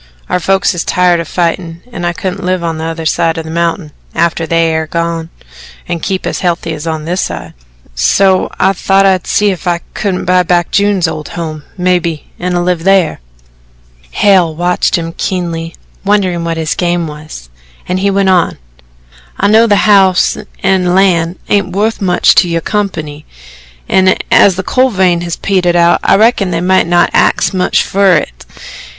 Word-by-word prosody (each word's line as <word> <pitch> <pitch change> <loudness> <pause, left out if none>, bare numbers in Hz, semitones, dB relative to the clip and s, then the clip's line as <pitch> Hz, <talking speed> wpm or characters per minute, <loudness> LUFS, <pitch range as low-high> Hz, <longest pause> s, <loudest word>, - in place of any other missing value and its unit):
Our 180 - 0
folks 190 +2 +1
is 175 - -3
tired 180 -1 +2
o' 165 - -3
fightin' 170 0 -3
and 175 -6 -4
I - - 0
couldn't 190 +3 -5
live 185 -1 -1
on 165 -1 -3
t'other 165 0 -4
side 165 +1 0
of 165 - -5
the 160 - -7
mountain, 170 -1 -2 0.2
after 165 0 0
they 165 +1 +2
air 160 0 -2
gone, 170 0 -3 0.6
an' 175 -1 -3
keep 190 +3 -3
as - - -3
healthy 170 -2 -1
as 155 +1 -7
on 160 -1 -3
this 180 +3 -1
side 85 -1 -5 0.4
so 185 - +2
I 190 +1 +3
thought 195 +1 +2
I'd 190 -2 +1
see 205 -1 +2
if 185 0 -6
I 170 -1 0
couldn't 190 -3 -2
buy 180 0 +3
back 175 -1 0
June's 200 -3 +2
old 155 -2 -5
home, 155 -3 -5
mebbe, 180 -3 0 0.2
an' 175 0 -1
live 180 -2 0
thar." 190 -2 +2 0.9
Hale 185 -6 +2
watched 175 +3 0
him 165 -1 -5
keenly, 170 -3 -3 0.3
wondering 190 -4 0
what 165 -1 -3
his 160 -1 -1
game 175 -1 -1
was 150 - -10 0.4
and 180 +1 -1
he 200 +1 +1
went 195 -1 +1
on: 180 -3 +2 0.8
"I 200 - +2
know 225 +2 +5
the 205 -2 +2
house 195 -3 +4 0.3
an' 185 -2 +2
land 180 -3 +2
ain't 200 -2 0
wuth 220 +2 -1
much 180 -2 +3
to - - +5
your 165 0 -1
company, 155 -9 -4 0.6
an' 190 0 +3 0.2
as 195 - +5
the 190 - -4
coal 260 +6 +2
vein 185 -5 +1
has 170 -1 -3
petered 180 -3 0
out, 170 0 +3
I - - +4
reckon 215 -2 +2
they 165 -2 -1
might 185 0 +2
not 175 0 +2
axe - - +2
much 185 -1 +1
fer 195 -2 +2
it." - - -6
175 Hz, 180 wpm, -12 LUFS, 165-190 Hz, 0.9 s, know